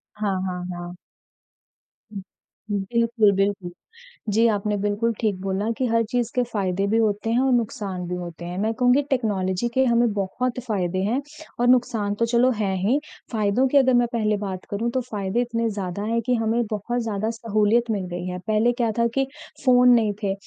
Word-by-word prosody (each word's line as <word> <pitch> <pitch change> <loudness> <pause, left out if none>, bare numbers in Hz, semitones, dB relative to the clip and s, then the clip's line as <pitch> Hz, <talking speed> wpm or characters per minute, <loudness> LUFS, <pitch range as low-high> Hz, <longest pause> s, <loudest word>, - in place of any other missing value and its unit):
हाँ, 205 -2 -1
हाँ, 180 -1 -4
हाँ। 175 0 -7 1.8
बिल्कुल, 220 +2 +2
बिल्कुल। 195 -2 0 0.6
जी, 225 +3 +4
आपने 210 -1 0
बिल्कुल 205 +3 0
ठीक 205 -5 0
बोला 195 +3 -1
कि 260 - 0
हर 230 0 +2
चीज़ 245 -2 0
के 250 - +3
फायदे 195 -5 -1
भी 220 - +2
होते 215 0 +1
हैं 235 - +2
और 265 0 +2
नुकसान 205 -6 -2
भी 180 - -3
होते 175 -1 -7
हैं, 175 +1 -5
मैं 220 +3 0
कहूँगी 250 +3 +3
टेक्नोलॉज़ी 205 -4 0
के 260 - +3
हमें 235 -1 +3
बहुत 235 +6 -2
फ़ायदे 185 -4 -1
हैं 240 +7 0 0.4
और 245 - +2
नुकसान 230 -5 +2
तो 230 - +3
चलो 240 +2 +3
हैं 195 -2 0
ही 255 +7 +3 0.3
फ़ायदों 220 +4 +2
की 285 - +3
अगर 260 -2 +4
मैं 240 0 +4
पहले 215 -2 +1
बात 190 -2 -5
करूँ 220 +4 -1
तो 255 +1 0
फ़ायदे 210 -1 -2
इतने 230 -1 -1
ज़्यादा 200 -2 -4
हैं 230 +2 0
कि 250 +2 0
हमें 225 +1 +1
बहुत 235 +4 -2
ज़्यादा 215 0 -2
सहूलियत 225 +1 +1
मिल 200 -3 -1
गई 175 0 -4
है। 180 0 -4
पहले 220 +2 +3
क्या 235 -2 0
था 235 - +4
कि 270 - +2 0.4
फ़ोन 250 -1 +6
नहीं 220 -3 +3
थे 195 - +1
220 Hz, 190 wpm, -23 LUFS, 200-240 Hz, 1.8 s, फ़ोन